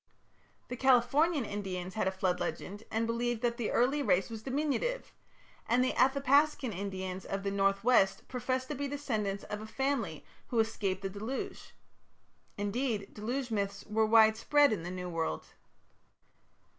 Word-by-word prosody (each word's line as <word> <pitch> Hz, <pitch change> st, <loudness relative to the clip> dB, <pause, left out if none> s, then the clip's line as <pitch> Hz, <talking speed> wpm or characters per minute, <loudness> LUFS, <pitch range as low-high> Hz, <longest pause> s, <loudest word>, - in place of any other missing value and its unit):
The 250 Hz, -, -3 dB
Californian 265 Hz, +4 st, +3 dB
Indians 190 Hz, -3 st, -4 dB
had 215 Hz, -, 0 dB
a -, -, +2 dB
flood 190 Hz, -1 st, 0 dB
legend, 205 Hz, +3 st, -5 dB
and 225 Hz, +1 st, 0 dB
believed 235 Hz, 0 st, -1 dB
that 235 Hz, -1 st, +1 dB
the 235 Hz, -4 st, -1 dB
early 270 Hz, +5 st, +2 dB
race 200 Hz, -4 st, +2 dB
was 220 Hz, -1 st, -6 dB
diminutive; 300 Hz, -, -2 dB, 0.6 s
and 245 Hz, +2 st, +4 dB
the 255 Hz, -, +1 dB
Athapascan 275 Hz, -1 st, +3 dB
Indians 190 Hz, -1 st, -4 dB
of 195 Hz, 0 st, -4 dB
the 200 Hz, -, -1 dB
north 195 Hz, 0 st, +1 dB
west 220 Hz, -6 st, +3 dB
professed 255 Hz, +1 st, -2 dB
to 300 Hz, -, -2 dB
be 285 Hz, +1 st, -2 dB
descendants 220 Hz, -9 st, -2 dB
of 210 Hz, 0 st, -5 dB
a 215 Hz, -, -7 dB
family 245 Hz, -, -2 dB, 0.2 s
who 240 Hz, -, -3 dB
escaped 200 Hz, -4 st, 0 dB
the 195 Hz, -, -1 dB
deluge. 220 Hz, +7 st, -5 dB, 0.8 s
Indeed, 205 Hz, 0 st, -2 dB
deluge 245 Hz, +4 st, -3 dB
myths 200 Hz, -2 st, -2 dB
were 220 Hz, +1 st, +1 dB
widespread 225 Hz, +5 st, +5 dB
in 195 Hz, -, -3 dB
the 175 Hz, -, -5 dB
"New 180 Hz, 0 st, -5 dB
World". 165 Hz, -, -2 dB
220 Hz, 155 wpm, -31 LUFS, 195-260 Hz, 0.8 s, widespread